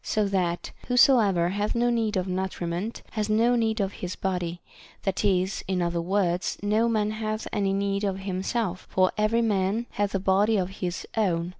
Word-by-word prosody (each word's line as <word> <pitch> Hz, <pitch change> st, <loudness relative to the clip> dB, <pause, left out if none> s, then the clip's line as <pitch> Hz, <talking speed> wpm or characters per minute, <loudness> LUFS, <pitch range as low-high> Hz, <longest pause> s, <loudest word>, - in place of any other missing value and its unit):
so 215 Hz, -1 st, 0 dB
that 180 Hz, -3 st, -1 dB, 0.2 s
whosoever 225 Hz, -9 st, +4 dB
hath 205 Hz, +4 st, -1 dB
no 240 Hz, +1 st, +2 dB
need 225 Hz, -3 st, 0 dB
of 185 Hz, 0 st, -1 dB
nutriment 185 Hz, +2 st, -3 dB
has 215 Hz, -1 st, -2 dB
no 230 Hz, +3 st, +3 dB
need 225 Hz, -1 st, +1 dB
of 200 Hz, 0 st, -1 dB
his 180 Hz, 0 st, -3 dB
body; 180 Hz, -2 st, -2 dB, 0.4 s
that 195 Hz, 0 st, -1 dB
is, 190 Hz, -1 st, +1 dB
in 185 Hz, -1 st, 0 dB
other 170 Hz, -1 st, 0 dB
words, 180 Hz, 0 st, 0 dB
no 215 Hz, +3 st, +2 dB
man 215 Hz, -2 st, +1 dB
hath 215 Hz, 0 st, -3 dB
any 200 Hz, -1 st, +1 dB
need 200 Hz, +1 st, 0 dB
of 195 Hz, -2 st, 0 dB
himself, 190 Hz, +1 st, -2 dB
for 185 Hz, 0 st, +3 dB
every 215 Hz, +2 st, +2 dB
man 205 Hz, +1 st, +1 dB
hath 205 Hz, -1 st, -1 dB
a -, -, +1 dB
body 200 Hz, +3 st, +3 dB
of 185 Hz, -1 st, 0 dB
his 180 Hz, -1 st, -3 dB
own. 175 Hz, -6 st, +1 dB
200 Hz, 180 wpm, -26 LUFS, 185-215 Hz, 0.4 s, whosoever